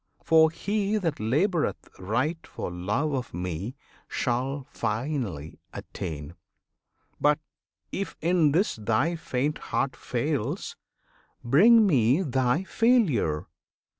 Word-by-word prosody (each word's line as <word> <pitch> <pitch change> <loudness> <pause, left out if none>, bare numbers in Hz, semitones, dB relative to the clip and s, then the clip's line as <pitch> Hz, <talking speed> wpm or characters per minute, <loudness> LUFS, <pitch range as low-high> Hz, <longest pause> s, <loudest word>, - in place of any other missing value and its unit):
For 160 -1 +6
he 205 +5 -1
that 165 -8 -2
laboureth 155 - 0
right 125 - -1
for - - -5
love 105 - -1
of 125 -9 -3
Me 90 - -4 0.3
Shall 130 +2 -2
finally 110 - -3
attain! 75 0 -6 0.9
But, 150 0 +4 0.5
if 195 -2 -4
in 165 -3 +3
this 180 - +1
Thy 110 +10 +1
faint 145 -1 -2
heart - - -1
fails, - - -2 0.7
bring 215 - +6
Me 135 - +3
thy 130 +2 +1
failure! 190 - +2
140 Hz, 105 wpm, -27 LUFS, 110-170 Hz, 0.9 s, For